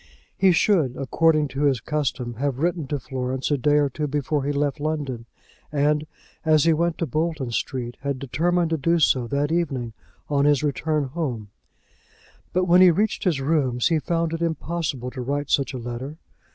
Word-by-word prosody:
He 190 -1 +4
should, 165 - +2
according 155 +2 +2
to 140 +3 -1
his 135 -4 +2
custom, 135 -3 -2
have 140 -2 -1
written 165 0 -1
to 145 - -1
Florence 130 +2 -3
a 145 - +3
day 145 +3 +3
or 145 -1 +3
two 150 +3 -3
before 145 0 -1
he 145 - 0
left 145 +1 -1
London, 145 -6 -3 0.4
and, 150 +1 +1 0.4
as 155 -2 +4
he 165 0 +4
went 170 +1 0
to 165 - -1
Bolton 155 -2 -2
Street, 120 0 -3
had 140 -1 -2
determined 165 +6 0
to 160 - +1
do 165 +4 +2
so 130 -6 +2
that 145 +4 -1
evening 135 -9 -1 0.3
on 140 -1 +1
his 145 0 +3
return 150 +1 0
home; 130 -9 -4 1.0
but 185 0 +1
when 180 +1 +5
he 185 - +9
reached 210 +6 0
his 170 -7 +2
rooms 135 -4 +1
he 165 -2 +2
found 165 0 -1
it 165 - -3
impossible 160 -6 -2
to 130 - -6
write 145 +3 -2
such 140 -3 +2
a 130 - -5
letter. 120 +5 -6
145 Hz, 185 wpm, -24 LUFS, 130-165 Hz, 1.0 s, he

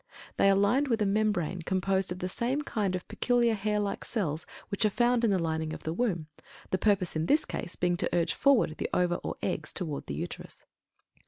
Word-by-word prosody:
They 195 - +5
are 195 - +5
lined 235 +9 +3
with 235 -3 +1
a - - +1
membrane 195 -4 0
composed 190 +1 0
of 180 - -3
the 180 - -3
same 250 +9 -1
kind 205 -8 -1
of 180 - -6
peculiar 240 -2 +2
hair 210 0 0
like 205 -1 -2
cells 160 -9 -2 0.2
which 200 +1 -1
are 215 - +5
found 240 +3 +2
in 230 - +4
the 195 - +3
lining 160 -2 -1
of - - -8
the 160 - -2
womb, 180 -6 -1 0.5
the 185 - +1
purpose 200 -5 +2
in 160 +1 0
this 300 - +3
case 175 - -5
being 175 0 +1
to - - +1
urge 170 -1 +1
forward 245 - +3
the - - -2
ova 175 -1 +2
or - - -5
eggs 160 -4 -2
toward 155 -6 -4
the 70 - -3
Uterus. - - -7
195 Hz, 220 wpm, -29 LUFS, 175-220 Hz, 0.5 s, They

